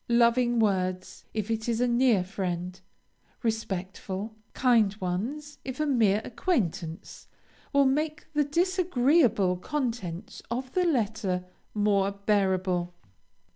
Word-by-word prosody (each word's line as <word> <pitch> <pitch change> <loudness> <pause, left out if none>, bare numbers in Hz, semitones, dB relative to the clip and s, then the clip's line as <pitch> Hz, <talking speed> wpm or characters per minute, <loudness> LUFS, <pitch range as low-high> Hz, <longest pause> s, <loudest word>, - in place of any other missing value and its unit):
Loving 240 +1 +4
words, 185 -4 0
if 215 0 -3
it 225 +1 -1
is 230 -1 0
a 245 - +3
near 240 -5 +3
friend, 180 -1 -4 0.6
respectful, 205 -1 -3 0.2
kind 230 -6 +3
ones 250 +12 -3
if 260 0 -6
a 305 - +2
mere 220 -7 +3
acquaintance, 185 - -2 0.4
will 280 0 +4
make 300 +3 0
the 295 0 +3
disagreeable 290 - +2
contents 220 - -4
of 255 +2 -4
the 365 -1 +2
letter 215 - 0 0.3
more 200 -1 +2
bearable. 190 -3 0
220 Hz, 110 wpm, -28 LUFS, 190-260 Hz, 0.6 s, Loving